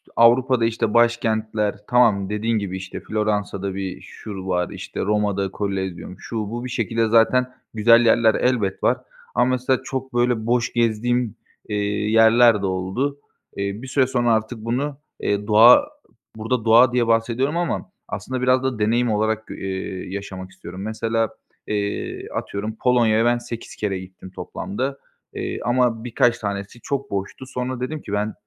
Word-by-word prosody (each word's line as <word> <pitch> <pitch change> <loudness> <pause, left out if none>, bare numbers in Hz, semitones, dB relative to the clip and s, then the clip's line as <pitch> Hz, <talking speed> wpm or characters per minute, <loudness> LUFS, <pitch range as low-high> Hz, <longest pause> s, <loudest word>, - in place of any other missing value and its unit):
Avrupa'da, 120 +1 +4
işte, 115 -1 -1
başkentler, 110 -3 +1
tamam, 110 -6 +3
dediğin 110 +2 0
gibi, 95 -2 -4
işte, 95 0 -7
Floransa'da 105 -3 -2
bir 95 -1 -6
şur 105 - -6
var, 90 -2 0
işte, - - -7
Roma'da 100 -2 0
Kolezyum, 95 -3 -4
şu, 115 - -6
bu... 120 +2 -5
Bir - - -5
şekilde 115 -1 0
zaten 120 +3 +3 0.2
güzel 115 +2 +5
yerler 115 -1 +4
elbet 115 -7 0
var - - +3 0.4
ama 125 - +4
mesela 130 0 +1
çok, 130 -1 -5
böyle, 120 -2 +1
boş 120 0 +1
gezdiğim, 120 0 0 0.3
eee, 105 - -2 0.4
yerler 115 0 +6
de - - -1
oldu. 95 +10 -2 0.4
Eee, 100 +2 -3
bir 130 - -8
süre 130 0 +2
sonra 120 -2 +2
artık 110 +2 -1
bunu, 135 +5 -2 0.2
eee, 105 0 -1
doğa, 115 - +7 0.5
burada 115 +1 -2
"doğa" 120 +2 +6
diye 120 -2 +2
bahsediyorum 115 +6 +1
ama 175 -2 -2 0.2
aslında 130 -1 -4
biraz 130 +1 +3
da 130 -4 -2
deneyim 115 +3 +2
olarak 110 +1 0
g - - -7
eee, 95 -1 -5
yaşamak 95 -2 -6
istiyorum. 95 0 -9
Mesela, 115 +1 -1 0.4
eee, 100 -1 -3
atıyorum, 105 +2 -4
Polonya'ya 115 -3 +3
ben 120 0 +3
8 120 -1 -8
kere 100 -3 -2
gittim 95 0 -11
toplamda, 130 +6 -4 0.4
eee, - - -4
ama 120 -2 +1
birkaç 120 0 +2
tanesi 100 +2 -5
çok 140 -1 -3
boştu. 100 +6 -4
Sonra 130 -1 -4
dedim 150 +5 -4
ki 100 - -7
"Ben 105 +1 -1
115 Hz, 155 wpm, -22 LUFS, 105-125 Hz, 0.5 s, doğa